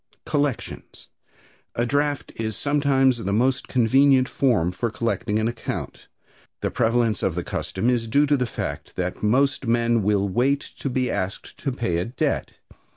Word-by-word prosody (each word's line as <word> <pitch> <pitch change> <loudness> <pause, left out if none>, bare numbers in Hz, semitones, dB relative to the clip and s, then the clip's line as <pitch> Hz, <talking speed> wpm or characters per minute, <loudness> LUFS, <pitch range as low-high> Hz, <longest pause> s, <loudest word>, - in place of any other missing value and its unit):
Collections. 145 -3 -3 0.7
A 120 - +1
draft 145 +2 0
is 110 -1 -3
sometimes 140 -3 +2
the 100 - -1
most 125 +5 +1
convenient 130 +2 +4
form 110 -13 +1
for 115 +6 -2
collecting 110 -1 -1
an 110 +1 +1
account. 120 - -5 0.5
The - - -1
prevalence 115 -2 +1
of 90 - 0
the 90 - -2
custom 95 +6 -3
is 120 -2 +1
due 140 +6 +3
to 145 0 +3
the 125 -3 0
fact - - -5
that 90 0 -3
most 135 +4 +2
men 115 0 +2
will 100 0 +1
wait 130 +9 +1 0.2
to 140 - -2
be 125 0 0
asked 95 -1 -4
to 140 - -2
pay 115 -9 -1
a 90 - -1
debt. 120 +2 -2
120 Hz, 160 wpm, -24 LUFS, 105-135 Hz, 0.7 s, convenient